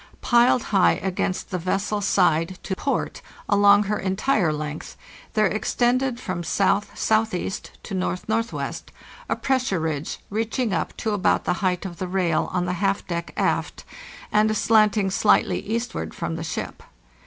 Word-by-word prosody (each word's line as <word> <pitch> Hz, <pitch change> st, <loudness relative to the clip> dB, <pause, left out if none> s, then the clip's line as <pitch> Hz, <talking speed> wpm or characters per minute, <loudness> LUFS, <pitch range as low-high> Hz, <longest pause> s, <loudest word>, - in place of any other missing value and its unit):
Piled 240 Hz, 0 st, +4 dB
high 190 Hz, -2 st, +5 dB
against 185 Hz, -1 st, -2 dB
the 180 Hz, -, -1 dB
vessel's 195 Hz, +3 st, -1 dB
side, 175 Hz, -1 st, +2 dB
to 190 Hz, -, -3 dB
port, 275 Hz, +8 st, -2 dB, 0.3 s
along 205 Hz, 0 st, +5 dB
her 210 Hz, +1 st, -1 dB
entire 190 Hz, -, +1 dB
length, 150 Hz, 0 st, -5 dB, 0.4 s
there 215 Hz, -1 st, +4 dB
extended 245 Hz, +4 st, +1 dB
from 185 Hz, -7 st, -4 dB
S.S.E. 205 Hz, +2 st, +1 dB, 0.3 s
to 195 Hz, -, -5 dB
N.N.W.a 220 Hz, -, -3 dB
pressure 255 Hz, -9 st, 0 dB
ridge 155 Hz, -2 st, -3 dB
reaching 225 Hz, +1 st, -1 dB
up 165 Hz, -, -2 dB
to 220 Hz, -, -2 dB
about 205 Hz, -2 st, +2 dB
the -, -, +1 dB
height 185 Hz, -1 st, 0 dB
of 175 Hz, -3 st, -6 dB
the 185 Hz, -, -3 dB
rail 180 Hz, -3 st, 0 dB
on 180 Hz, -1 st, 0 dB
the 180 Hz, -, -1 dB
half 195 Hz, 0 st, +1 dB
deck 170 Hz, -1 st, -4 dB
aft -, -, -1 dB, 0.5 s
and 215 Hz, 0 st, +3 dB
slanting 215 Hz, -3 st, +3 dB
slightly 205 Hz, +2 st, +3 dB
eastward 230 Hz, +3 st, -4 dB
from 170 Hz, -3 st, -3 dB
the 165 Hz, -, -5 dB
ship. 165 Hz, -, -5 dB
195 Hz, 140 wpm, -24 LUFS, 180-220 Hz, 0.5 s, high